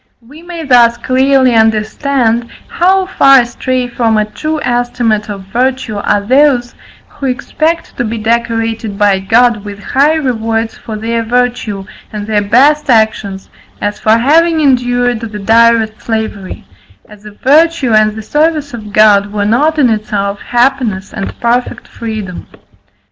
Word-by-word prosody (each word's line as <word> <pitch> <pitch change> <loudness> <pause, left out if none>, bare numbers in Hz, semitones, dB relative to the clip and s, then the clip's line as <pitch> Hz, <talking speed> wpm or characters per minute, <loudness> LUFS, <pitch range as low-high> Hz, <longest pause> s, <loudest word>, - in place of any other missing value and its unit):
We 300 +5 -14
may 345 -1 -8
thus 240 -4 +4
clearly 260 0 +2
understand, 225 +2 0 0.2
how 375 +2 +1
far 275 -8 +5
astray 250 +1 -3
from 230 -2 0
a 215 - +1
true 310 +9 -4
estimate 240 -3 -1
of 200 -2 -6
virtue 250 -3 -1
are 205 0 0
those 260 0 +2 0.3
who 275 - -6
expect 315 +6 -2
to - - -1
be 230 0 -4
decorated 225 -1 -2
by 200 -2 +2
God 225 +2 +2
with 205 -1 -8
high 285 +8 +2
rewards 225 -6 -2
for 220 - -8
their 230 +2 -2
virtue, 235 -4 -2 0.3
and 210 -2 -6
their 210 -1 0
best 275 +9 +2
actions, 220 -4 0 0.3
as 205 0 -3
for 220 +1 +3
having 320 +6 +2
endured 245 -4 +1
the 220 -2 -7
direst 225 +1 +2
slavery; 220 -4 -5 0.4
as 210 -1 -16
if 210 -1 -13
virtue 290 -2 +2
and 215 0 +3
the 220 - -7
service 300 +1 -1
of 215 -3 -8
God 205 -1 +4
were 205 -1 -2
not 290 +9 +1
in 280 -4 +4
itself 205 -2 -2
happiness 240 -6 -1
and 195 - -6
perfect 240 +1 -1
freedom. 215 -6 -7
235 Hz, 145 wpm, -12 LUFS, 215-260 Hz, 0.4 s, far